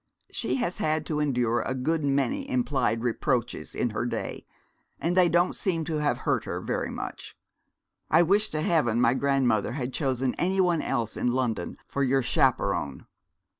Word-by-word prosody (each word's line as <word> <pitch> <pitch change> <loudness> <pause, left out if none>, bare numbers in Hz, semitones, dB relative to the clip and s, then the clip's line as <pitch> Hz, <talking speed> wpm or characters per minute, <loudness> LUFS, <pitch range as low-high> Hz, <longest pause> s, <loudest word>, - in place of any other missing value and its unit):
'She - - -1
has 240 -9 -2
had 155 0 0
to 150 -2 -2
endure 125 -5 +1
a 130 - -2
good 155 +5 0
many 200 - 0
implied 135 - 0
reproaches 120 0 -1
in 120 - 0
her 110 - -2
day, 120 - -4 0.5
and 175 +2 0
they 180 -2 +5
don't 175 +2 +2
seem 170 -4 -1
to 155 0 -2
have 150 -1 +1
hurt - - +1
her - - -3
very - - -2
much. - - -7 0.7
I 160 +3 +6
wish 200 +5 +3
to 155 - -2
heaven 125 -10 +2
my 120 0 +4
grandmother 130 -5 +1
had 130 -1 -4
chosen 130 -3 0
any 190 +2 +1
one 175 -4 +3
else 115 -2 -2
in 125 - 0
London 120 -8 -1
for 140 - -3
your 135 0 +2
chaperon.' 95 - +1
140 Hz, 170 wpm, -27 LUFS, 120-165 Hz, 0.7 s, I